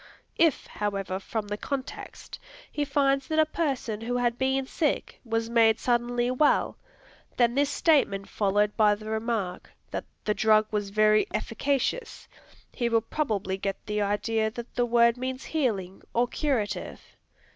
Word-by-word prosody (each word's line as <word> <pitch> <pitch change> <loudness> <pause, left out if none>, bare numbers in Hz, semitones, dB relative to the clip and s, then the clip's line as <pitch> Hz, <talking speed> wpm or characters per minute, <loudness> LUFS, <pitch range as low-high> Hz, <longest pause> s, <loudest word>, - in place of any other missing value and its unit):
If, 325 -5 +3
however, 195 -2 -3
from 210 +2 -4
the 205 0 -3
context, 270 +3 -6 0.3
he 295 - -1
finds 275 -1 +1
that 315 - -1
a 315 - +6
person 270 -9 -2
who 245 +2 -1
had 240 -1 +1
been 265 0 +1
sick, 295 +2 -2
was 225 -1 -1
made 225 -1 +4
suddenly 240 0 +1
well, 290 +4 +2 0.6
and 240 0 +3
this 285 0 +2
statement 275 - +2
followed 205 0 +1
by 210 -2 +4
the 215 +1 -8
remark, 220 -4 -2 0.2
that - - -4 0.2
"the 210 - +2
drug 215 0 +4
was 205 -2 -1
very 215 +1 +4
efficacious," 280 - -2 0.5
he 240 -1 -1
will 230 -1 +3
probably 215 -7 -2
get 195 0 -2
the 210 0 -1
idea 220 +2 0
that 235 +2 -9
the 245 0 +1
word 235 0 +4
means 260 +1 -4
"healing," 205 - -2
or 240 +1 +3
"curative." 215 - -2
230 Hz, 150 wpm, -27 LUFS, 210-265 Hz, 0.6 s, a